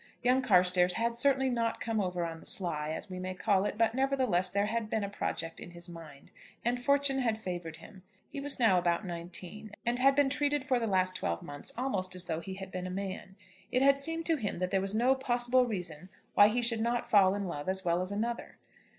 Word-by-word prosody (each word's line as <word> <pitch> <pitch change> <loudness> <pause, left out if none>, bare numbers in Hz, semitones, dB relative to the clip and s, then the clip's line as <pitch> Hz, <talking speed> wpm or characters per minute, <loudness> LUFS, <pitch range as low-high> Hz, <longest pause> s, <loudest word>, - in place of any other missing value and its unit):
Young 250 +1 +3
Carstairs 180 -5 +4
had 235 +4 0
certainly 265 +1 +3
not 230 -1 -1
come 225 -2 -1
over 180 -2 -2
on 165 -1 -6
the - - -16
sly, 155 -5 0
as 160 +6 -4
we 185 -2 -7
may 185 0 -4
call 195 0 +1
it, 210 - -3
but 225 0 +2
nevertheless 260 -9 +1
there 200 +1 +1
had 220 0 -2
been 220 -1 -1
a 200 - -3
project 165 -4 -4
in - - -9
his 175 0 -9
mind, 160 -5 -12 0.3
and 245 +1 0
fortune 280 0 +2
had 230 -4 0
favoured 175 -5 -5
him. 195 -3 -14 0.3
He 290 - -7
was 285 -1 -3
now 205 -7 +5
about 175 +3 0
nineteen, 180 +4 -6
and 240 +1 0
had 275 +1 +5
been 285 -1 +3
treated 290 -1 0
for 260 -3 +2
the 230 - -1
last 185 -2 +1
twelve 85 - -2
months 145 0 -4
almost 190 -8 -1
as 180 0 -5
though 160 -2 -2
he 190 +2 -7
had 190 -1 -8
been 185 0 -4
a - - -5
man. 190 0 -5 0.4
It 255 - +2
had 275 0 +5
seemed 325 +3 -2
to 325 -2 +3
him 215 -7 -3
that 180 +1 -2
there 195 - +2
was 195 +2 -2
no 245 +4 +4
possible 250 -1 +1
reason 180 -5 -5 0.2
why 205 - +7
he 240 +3 0
should 230 -1 +3
not 235 +1 0
fall 195 -2 +5
in 200 -1 -3
love 145 -3 -4
as 190 0 -2
well 170 +1 +2
as 185 +2 -3
another. 230 +4 -3
205 Hz, 235 wpm, -31 LUFS, 180-245 Hz, 0.4 s, why